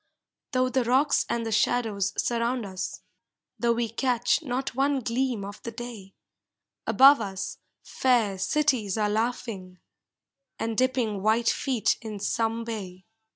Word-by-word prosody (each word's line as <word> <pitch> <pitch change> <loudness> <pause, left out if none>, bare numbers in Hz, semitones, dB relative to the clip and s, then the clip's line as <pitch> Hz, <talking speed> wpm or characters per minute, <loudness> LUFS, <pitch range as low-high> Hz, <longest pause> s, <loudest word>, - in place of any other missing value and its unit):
Though 255 0 +2
the 255 0 +1
rocks 260 +5 +2
and 235 -1 -1
the 225 - -3
shadows 215 -3 +1
surround 235 0 0
us. 190 -1 -5 0.6
Though 235 -1 +3
we 235 0 -1
catch 245 +4 +1
not 260 -3 -3
one 275 +1 +1
gleam 235 -3 -1
of 200 +1 -9
the - - -5
day, 230 -4 -9 0.7
Above 275 -1 +7
us 195 -1 -5 0.2
fair 230 -7 +1
cities 245 -4 +1
are 210 -1 +1
laughing, 215 -5 -3 0.8
And 225 0 -2
dipping 245 -5 0
white 220 +3 +3
feet 255 -7 0
in 220 -2 -6
some 225 +3 -1
bay. 190 -5 -7
230 Hz, 135 wpm, -27 LUFS, 210-255 Hz, 0.8 s, Above